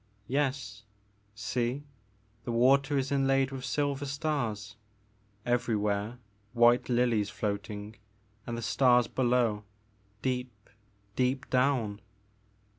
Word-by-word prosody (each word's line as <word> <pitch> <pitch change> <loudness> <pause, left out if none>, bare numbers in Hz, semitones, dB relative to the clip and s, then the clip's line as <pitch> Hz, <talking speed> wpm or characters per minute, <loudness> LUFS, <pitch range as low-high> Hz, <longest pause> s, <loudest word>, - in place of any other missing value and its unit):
Yes. 130 -4 -1 0.5
See, 120 +5 -2 0.6
the 120 - -3
water 135 +4 +4
is 135 0 -1
inlaid 135 -1 +2
with 135 -1 -6
silver 140 0 -1
stars, 135 - -2 0.3
— 105 0 -37
everywhere 105 -1 -1 0.4
white 120 +1 +4
lilies 120 -4 +2
floating 105 +1 -4 0.5
and 120 -1 -3
the 115 - -5
stars 125 +2 +4
below, 120 -4 +1 0.6
deep, 125 -5 -3 0.4
deep 130 +1 0
down." 125 -6 +1
120 Hz, 100 wpm, -30 LUFS, 105-135 Hz, 0.6 s, water